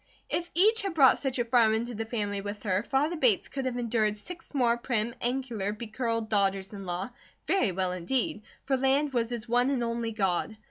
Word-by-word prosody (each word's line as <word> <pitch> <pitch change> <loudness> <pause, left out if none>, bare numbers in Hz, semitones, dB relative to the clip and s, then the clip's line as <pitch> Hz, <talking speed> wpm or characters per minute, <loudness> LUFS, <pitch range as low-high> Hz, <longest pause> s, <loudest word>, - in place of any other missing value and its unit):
If 345 0 -1
each 435 +6 +5
had 390 -4 -3
brought 270 -4 +6
such 265 -2 -2
a 240 - 0
farm 230 -2 +4
into 235 +2 -2
the 225 0 -4
family 205 -3 -2
with 205 +1 -6
her, 190 -2 +1
father 275 +8 0
Bates 400 +4 +3
could 270 -1 -4
have 250 -1 -2
endured 220 -3 +1
six 335 +9 -7
more 245 -5 +2
prim, 235 -2 -1
angular, 240 -5 -1
becurled 230 +1 -3
daughters 195 -2 0
in 195 -2 -8
law, 180 +6 -3 0.3
very 380 - +2
well 185 0 -1
indeed, 210 +5 -1 0.2
for 270 -1 +1
land 270 +2 +2
was 230 -2 0
his 240 -1 -5
one 245 +2 +2
and 265 -4 0
only 230 -1 -2
God. 200 0 -1
235 Hz, 200 wpm, -28 LUFS, 210-265 Hz, 0.3 s, brought